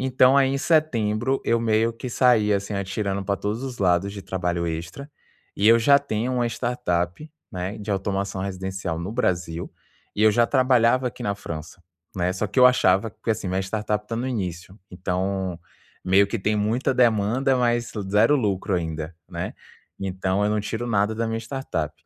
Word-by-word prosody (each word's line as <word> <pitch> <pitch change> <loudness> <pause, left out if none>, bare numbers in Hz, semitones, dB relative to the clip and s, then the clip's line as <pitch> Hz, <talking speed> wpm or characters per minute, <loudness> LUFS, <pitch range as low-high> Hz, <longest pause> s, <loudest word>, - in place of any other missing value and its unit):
Então, 130 +1 +4
aí, 135 -1 +4
em 135 - -1
setembro 130 -6 +1
eu 115 - +2
meio 115 0 +1
que 125 +2 -7
saí, 115 -4 +3
assim, 100 +1 -2
atirando 100 0 -2
pra 100 0 0
todos 105 +6 -3
os 130 -2 -6
lados 95 +1 +2
de 100 - -7
trabalho 90 -2 -2
extra. 85 - -6 0.5
E 100 - +1
eu 115 +1 +7
já 140 +5 +5
tenho 125 -2 -2
uma 120 -1 +1
startup, 115 - -2 0.2
né, 95 +1 -4
de 105 0 -6
automação 95 0 -2
residencial 95 -3 -4
no 85 +4 -4
Brasil, 85 -8 -2 0.4
e 105 - 0
eu 110 - +7
já 120 +2 +3
trabalhava 130 -1 +3
aqui - - -10
na 100 0 -1
França, 85 -2 -8 0.3
né. 90 0 0
Só 105 +3 -2
que 105 +6 0
eu 125 - +9
achava 110 -4 +3
que 110 - -5
assim, 105 -3 -2
minha 95 +1 0
startup 105 +1 -2
tá 115 - -4
no 125 +3 -2
início, 95 -4 -5
então 95 0 -2 0.5
meio 95 +2 +4
que 115 - -2
tem 105 +2 0
muita 110 +6 0
demanda, 125 +2 +2
mas 120 -1 +1 0.2
0 110 +8 +4
lucro 100 -5 -1
ainda, 80 -1 -4
né? - - -5 0.5
Então 95 +1 -1
eu 105 - +1
não 105 0 +1
tiro 110 +3 -4
nada 105 -1 +1
da 115 +1 -1
minha 115 0 -2
startup. 115 - -4
105 Hz, 180 wpm, -24 LUFS, 95-120 Hz, 0.5 s, eu